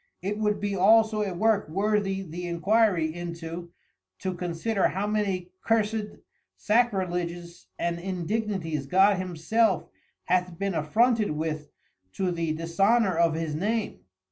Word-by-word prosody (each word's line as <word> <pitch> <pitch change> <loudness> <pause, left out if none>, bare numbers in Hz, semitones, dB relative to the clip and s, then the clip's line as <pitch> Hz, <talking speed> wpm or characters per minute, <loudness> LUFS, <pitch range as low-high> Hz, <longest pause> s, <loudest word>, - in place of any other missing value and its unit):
It 205 +2 -2
would 210 -1 +1
be 205 -1 -2
also 215 +3 +4
a 200 -2 -1
Work 215 -1 +2
worthy 195 +1 0
the 175 0 -6
inquiry 175 -2 +2
into, 170 0 -6 0.5
to 185 - -3
consider 180 +4 0
how 195 +2 -2
many 195 -4 -1
cursed 220 -1 0 0.4
Sacriledges 180 -6 -1
and 170 0 -1
Indignities 185 -4 -2
God 195 +5 +4
himself 185 +3 +1 0.4
hath 180 -1 0
been 195 +1 -1
affronted 215 +8 +2
with 155 0 -3 0.4
to 185 -2 -1
the 165 -2 -1
dishonour 190 +5 +2
of 165 -1 +3
his 160 -2 -2
Name. 210 +7 -1
185 Hz, 125 wpm, -27 LUFS, 170-210 Hz, 0.5 s, also